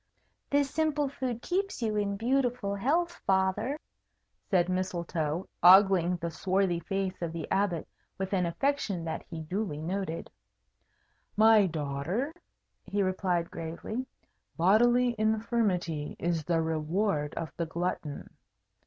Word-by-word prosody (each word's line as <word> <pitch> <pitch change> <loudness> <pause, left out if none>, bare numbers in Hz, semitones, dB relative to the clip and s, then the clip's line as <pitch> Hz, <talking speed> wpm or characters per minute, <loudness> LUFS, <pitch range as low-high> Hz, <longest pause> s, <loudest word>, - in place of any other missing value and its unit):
"This 285 -1 +2
simple 300 -2 +1
food 255 -4 -4
keeps 385 -6 -1
you 215 -2 0
in 200 -1 0
beautiful 245 -3 0
health, 325 - 0
Father," 190 +9 +1 0.7
said 180 -3 +3
Mistletoe, 175 -3 -2
ogling 180 -1 +7
the 170 -1 -4
swarthy 185 0 +1
face 190 0 -3
of 170 -2 -2
the 165 -2 -5
Abbot 190 -5 +1 0.3
with 190 +1 -3
an 180 -3 +2
affection 210 -4 -1
that 160 - -3
he 165 -3 -5
duly 180 -1 -3
noted. 170 0 -3 1.1
"My 215 -2 +6
daughter," 160 - -2 0.5
he 200 0 0
replied, 185 -2 0
gravely, 170 +10 -5 0.5
"bodily 240 +7 +4
infirmity 215 -8 0
is 165 -3 -1
the 165 -1 +1
reward 160 0 -1
of 160 -4 -4
the 170 0 -2
glutton. 165 -3 -4
190 Hz, 120 wpm, -29 LUFS, 170-225 Hz, 1.1 s, ogling